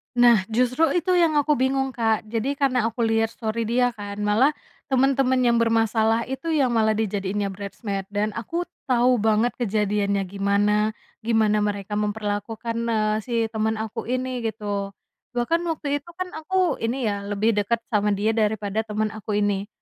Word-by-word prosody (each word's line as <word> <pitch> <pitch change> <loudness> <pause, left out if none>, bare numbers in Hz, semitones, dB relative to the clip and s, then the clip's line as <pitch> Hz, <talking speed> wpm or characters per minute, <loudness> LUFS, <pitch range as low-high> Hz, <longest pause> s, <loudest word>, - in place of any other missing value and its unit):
Nah, 235 -5 +5
justru 250 +7 +2
itu 355 +2 +1
yang 330 -3 +3
aku 295 -1 +3
bingung, 265 0 +1
Kak. 225 -3 0
Jadi 245 +5 -1
karena 255 -5 +1
aku 230 +1 -2
liat 225 0 +1
story 225 -1 -2
dia 245 +1 +2
kan, 205 -2 -7
malah 240 +8 +3 0.3
temen-temen 265 -1 +2
yang 235 - +2
bermasalah 225 0 +2
itu 265 +4 -6
yang 285 -6 +2
malah 220 -2 +2
dijadiinnya 200 -1 -1
bridesmaid, 200 0 -5
dan 210 +1 -1
aku 330 +11 -3 0.2
tau 250 -1 +3
banget 220 +3 +2
kejadiannya 205 -2 0
gimana, 205 +3 +1 0.2
gimana 220 -2 +2
mereka 205 0 -2
memperlakukan, 210 +2 -3
eee, 215 -2 +1
si 240 +3 -7 0.2
temen 220 0 0
aku 220 0 -5
ini, 255 0 -2
gitu, 205 -2 -4 0.4
bahkan 245 +8 +1
waktu 290 -3 -1
itu 315 - -34
kan 370 -1 -4
aku 365 +3 0
ini, 240 +4 -2
ya, 205 -3 0
lebih 210 +2 +1
deket 220 +2 0
sama 210 -1 +2
dia 215 +3 +1
daripada 215 -1 0
temen 215 0 -1
aku 215 -1 -4
ini, 200 0 -1
225 Hz, 160 wpm, -24 LUFS, 210-250 Hz, 0.4 s, Nah